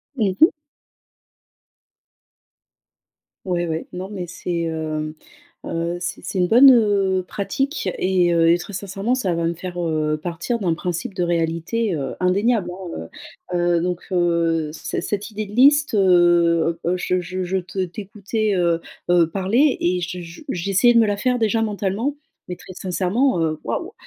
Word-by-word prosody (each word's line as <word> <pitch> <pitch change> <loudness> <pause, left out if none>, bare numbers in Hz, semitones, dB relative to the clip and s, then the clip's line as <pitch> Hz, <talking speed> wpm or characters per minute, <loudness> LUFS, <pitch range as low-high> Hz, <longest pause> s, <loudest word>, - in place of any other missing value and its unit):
Mmh 205 -7 0
mh. 320 - +10 3.0
Ouais, 175 -2 -1
ouais. 160 0 -3
Non, 185 +2 -6
mais 190 -4 -5
c'est, 170 -1 -3
heu, 155 -1 -3 0.5
heu, 170 +1 -2
c'est 175 0 -4
c'est - - -5
une 180 - +3
bonne, 250 +7 +8
heu, 200 -5 +3
pratique 270 - -2
et 180 -2 +2
heu, 165 -1 +4
et 170 - +4
très 175 +4 -9
sincèrement 195 +5 -2
ça 195 -9 -1
va 165 0 -1
me 165 - 0
faire, 175 +1 -7
heu, 155 -2 0
partir 175 +8 -3
d'un 180 -5 +1
principe 180 +6 -4
de 185 -2 -1
réalité, 170 +6 -1
heu, 140 -3 -4
indéniable, 195 +2 +1
hein, 175 - -7 0.4
heu. - - +1 0.2
Heu, - - 0
donc 180 0 -2
heu, 170 -3 +1
cet 165 - -4
cette 205 +3 -3
idée 215 0 -4
de 205 - -11
liste, 285 +4 +5
heu, 175 -3 +3
heu, 180 +2 +1
je 180 0 0
je 185 +1 -4
je 185 +2 -1
te 185 +1 -3
t'écoutais, 210 +3 -3
heu, 170 -2 +1 0.3
heu, 175 -2 +4
parler 220 - +2
et 180 +1 0
je 180 +1 -4
je 165 0 -11
j'essayais 195 +5 +3
de 235 - +5
me 225 - +4
la 205 -1 0
faire 250 +3 0
déjà 225 0 +1
mentalement, 210 +5 -1 0.3
mais 180 - -3
très 185 - -12
sincèrement, 185 - 0
heu, 155 -1 -1
waouh! 370 +5 -4
180 Hz, 165 wpm, -21 LUFS, 170-210 Hz, 3.0 s, mh